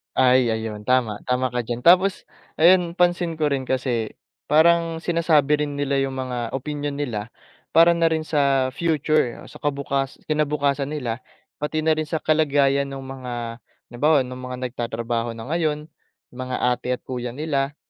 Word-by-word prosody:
Ay 125 Hz, -1 st, +4 dB
ayun, 110 Hz, -2 st, -3 dB
tama, 120 Hz, -5 st, +2 dB
tama 125 Hz, 0 st, 0 dB
ka 125 Hz, -, -2 dB
diyan. 120 Hz, +1 st, -4 dB
Tapos 185 Hz, +3 st, +5 dB, 0.3 s
ayun, 175 Hz, +1 st, +4 dB
pansin 175 Hz, -2 st, +1 dB
ko 155 Hz, -2 st, 0 dB
rin 135 Hz, -2 st, -1 dB
kasi, 120 Hz, -4 st, -1 dB, 0.3 s
parang 165 Hz, +2 st, +3 dB
sinasabi 155 Hz, -4 st, +2 dB
rin 145 Hz, -, -6 dB
nila 140 Hz, -1 st, 0 dB
yung 135 Hz, -1 st, -1 dB
mga 125 Hz, -2 st, -3 dB
opinyon 145 Hz, +1 st, -4 dB
nila, 115 Hz, -7 st, -3 dB, 0.5 s
para 165 Hz, +1 st, +7 dB
na 170 Hz, -1 st, +2 dB
rin 160 Hz, -1 st, 0 dB
sa 140 Hz, -4 st, +1 dB
future, 155 Hz, -4 st, 0 dB
sa -, -, -12 dB
kabukas 140 Hz, -1 st, -2 dB
kinabukasan 145 Hz, -2 st, 0 dB
nila, 130 Hz, -6 st, -3 dB, 0.4 s
pati 155 Hz, +1 st, -2 dB
na 160 Hz, -, +3 dB
rin 155 Hz, 0 st, 0 dB
sa 160 Hz, +1 st, -3 dB
kalagayan 140 Hz, -3 st, +2 dB
nung 135 Hz, -1 st, -7 dB
mga 125 Hz, -3 st, -6 dB, 0.3 s
halimbawa 145 Hz, +3 st, +3 dB
nung 125 Hz, 0 st, -8 dB
mga 125 Hz, 0 st, -6 dB
nagtatrabaho 115 Hz, -1 st, -3 dB
na 115 Hz, +5 st, -7 dB
ngayon, 155 Hz, -2 st, -1 dB, 0.4 s
mga 130 Hz, 0 st, -5 dB
ate 125 Hz, 0 st, +1 dB
at 120 Hz, -, -19 dB
kuya 125 Hz, -2 st, -5 dB
nila, 145 Hz, -1 st, -1 dB
140 Hz, 160 wpm, -23 LUFS, 125-155 Hz, 0.5 s, para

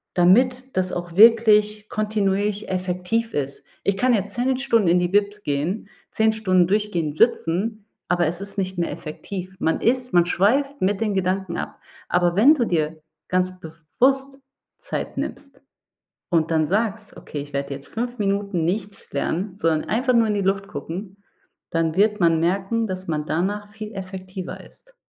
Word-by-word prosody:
damit 250 Hz, +9 st, +3 dB
das 185 Hz, 0 st, +1 dB
auch 175 Hz, -1 st, -5 dB
wirklich 210 Hz, -1 st, +5 dB
kontinuierlich 210 Hz, -1 st, -1 dB
effektiv 185 Hz, +5 st, -1 dB
ist. 140 Hz, -1 st, -3 dB, 0.2 s
Ich 200 Hz, -1 st, +1 dB
kann 250 Hz, +4 st, +3 dB
jetzt 205 Hz, -2 st, -1 dB
10 255 Hz, +2 st, +1 dB
Stunden 230 Hz, -7 st, +2 dB
in 175 Hz, +1 st, +4 dB
die 175 Hz, -, +1 dB
Bib 205 Hz, +2 st, 0 dB
gehen, 150 Hz, +10 st, -2 dB, 0.2 s
10 220 Hz, 0 st, +2 dB
Stunden 185 Hz, -5 st, +2 dB
durchgehend 180 Hz, -7 st, -1 dB
sitzen, 215 Hz, +1 st, +1 dB, 0.2 s
aber 175 Hz, 0 st, +2 dB
es 170 Hz, +3 st, -3 dB
ist 200 Hz, +1 st, -6 dB
nicht 190 Hz, -1 st, -2 dB
mehr 170 Hz, -, -1 dB
effektiv. 185 Hz, +4 st, -7 dB
Man 160 Hz, -, +1 dB
ist 250 Hz, +1 st, +1 dB
man 175 Hz, -1 st, +5 dB
schweift 270 Hz, +11 st, +1 dB
mit 190 Hz, +1 st, +1 dB
den 215 Hz, -2 st, +1 dB
Gedanken 190 Hz, -1 st, -1 dB
ab. -, -, -5 dB, 0.3 s
Aber 175 Hz, -1 st, +2 dB
wenn 260 Hz, +11 st, +7 dB
du 245 Hz, -5 st, +1 dB
dir 155 Hz, -4 st, -1 dB, 0.3 s
ganz 185 Hz, 0 st, 0 dB
bewusst 260 Hz, -, 0 dB, 0.4 s
Zeit -, -, -5 dB
nimmst -, -, -6 dB, 0.7 s
und 165 Hz, -2 st, +2 dB
dann 160 Hz, -1 st, +3 dB
sagst: 210 Hz, +3 st, -1 dB
„Okay, 145 Hz, -, -6 dB
ich 145 Hz, +1 st, -9 dB
werde 140 Hz, 0 st, -3 dB
jetzt 140 Hz, +1 st, -10 dB
5 240 Hz, +2 st, -4 dB
Minuten 200 Hz, -4 st, 0 dB
nichts 200 Hz, +3 st, -3 dB
lernen, 180 Hz, +7 st, -2 dB
sondern 165 Hz, -6 st, 0 dB
einfach 250 Hz, +4 st, +2 dB
nur 230 Hz, -2 st, +4 dB
in 210 Hz, -, +1 dB
die 205 Hz, -, 0 dB
Luft 195 Hz, +1 st, 0 dB
gucken“, 190 Hz, +7 st, -7 dB, 0.5 s
dann 165 Hz, -1 st, 0 dB
wird 210 Hz, +1 st, +3 dB
man 165 Hz, -2 st, +4 dB
merken, 195 Hz, +6 st, 0 dB
dass 185 Hz, -2 st, -6 dB
man 150 Hz, -2 st, -2 dB
danach 195 Hz, +7 st, -1 dB
viel 215 Hz, 0 st, -8 dB
effektiver 185 Hz, -1 st, -7 dB
ist. -, -, -22 dB
195 Hz, 165 wpm, -23 LUFS, 175-215 Hz, 0.7 s, wenn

